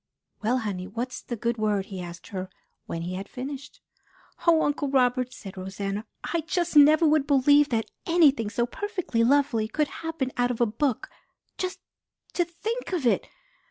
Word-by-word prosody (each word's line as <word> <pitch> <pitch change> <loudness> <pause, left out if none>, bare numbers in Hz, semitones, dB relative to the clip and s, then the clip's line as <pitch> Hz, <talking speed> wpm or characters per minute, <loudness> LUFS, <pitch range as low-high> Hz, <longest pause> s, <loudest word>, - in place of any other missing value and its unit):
"Well, 235 +4 +2
honey, 200 -6 -3
what's 240 +5 -4
the 240 - -5
good 235 +1 -2
word?" 210 -2 +1
he 190 -2 -6
asked 170 -1 -9
her 185 -1 -5 0.4
when 165 0 -4
he 180 +2 -4
had 195 +2 -5
finished. 275 +3 -7 0.7
"Oh, 325 -2 +6
Uncle 290 -1 0
Robert," 255 -1 +2
said 195 -6 -10
Rosanna, 195 +2 -4 0.2
"I 335 - -1
just 345 +1 -1
never 300 +2 +7
would 305 -2 +3
believe 285 +1 +5
that 225 -2 -1 0.2
anything 290 -10 +4
so 235 +2 0
perfectly 365 - -2
lovely 255 -4 +3
could 300 +5 0
happen 325 -5 -2
out 245 0 +2
of 245 - -3
a 240 - +5
book. 235 +3 -1 0.5
Just 370 0 -4 0.5
to 350 - +2
think 430 +7 -4
of 330 -8 -1
it! 235 - +2
255 Hz, 170 wpm, -26 LUFS, 215-300 Hz, 0.7 s, never